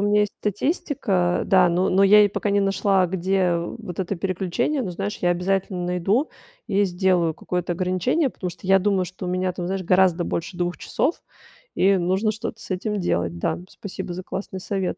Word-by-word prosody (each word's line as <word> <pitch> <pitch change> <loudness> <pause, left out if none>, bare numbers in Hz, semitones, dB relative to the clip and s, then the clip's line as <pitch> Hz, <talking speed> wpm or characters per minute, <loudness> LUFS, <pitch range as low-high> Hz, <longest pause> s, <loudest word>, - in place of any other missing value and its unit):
меня 205 0 +3
есть 205 - 0
статистика. 205 - 0
Да, 185 -2 +5
но 180 +2 +1
но 195 +2 +4
я 210 +2 +7
ей 205 - +5
пока 205 +1 -2
не 200 0 +3
нашла, 195 -1 +2
где, 190 +1 -1
э, 175 -2 +2 0.2
вот 185 -6 -8
это 190 +1 -1
переключение. 190 - -1
Ну, 185 - -3
знаешь, 200 +4 -3
я 175 - +3
обязательно 180 0 -1
найду 190 - 0 0.4
и 200 0 +3
сделаю 180 -3 +1
какое-то 180 -1 -3
ограничение, 185 - 0
потому 180 - -5
что 175 +1 -11
я 195 +1 +5
думаю, 195 -1 +1
что 185 0 -7
у - - -2
меня 185 0 0
там, 175 0 -5
знаешь, 190 0 -2
гораздо 185 -1 +3
больше 170 +1 -4
2 175 0 -2
часов, 320 - -1 0.6
и 195 +1 +4
нужно 190 +5 +1
что-то 215 +1 -6
с - - -10
этим 205 +3 -2
делать, 85 - -1
да. 160 - -1
Спасибо 190 -3 -7
за 185 - -6
классный 190 -1 -5
совет. 190 -1 -2
185 Hz, 195 wpm, -23 LUFS, 180-200 Hz, 0.6 s, я